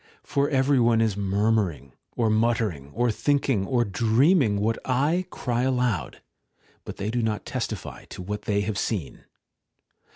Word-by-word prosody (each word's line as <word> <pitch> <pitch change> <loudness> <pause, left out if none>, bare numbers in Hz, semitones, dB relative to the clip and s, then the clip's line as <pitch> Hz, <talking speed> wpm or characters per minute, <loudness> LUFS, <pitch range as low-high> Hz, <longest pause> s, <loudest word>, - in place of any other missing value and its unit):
For 140 0 0
every 135 -1 +3
one 115 -1 +4
is 110 -3 +1
murmuring, 100 - 0 0.2
or 115 -2 +1
muttering, 110 - 0
or 120 0 +2
thinking, 135 -5 0
or 120 -2 +2
dreaming, 115 - +3
what 110 +2 0
I 150 +8 +1
cry 120 -7 -2
aloud; 125 -7 -1 0.6
but - - -7
they 105 +2 -3
do 120 +1 0
not 110 -2 -2
testify - - -5
to 90 - -9
what 105 +2 -5
they 100 -1 +1
have 100 0 -2
seen. 95 - -3
115 Hz, 150 wpm, -25 LUFS, 100-125 Hz, 0.6 s, one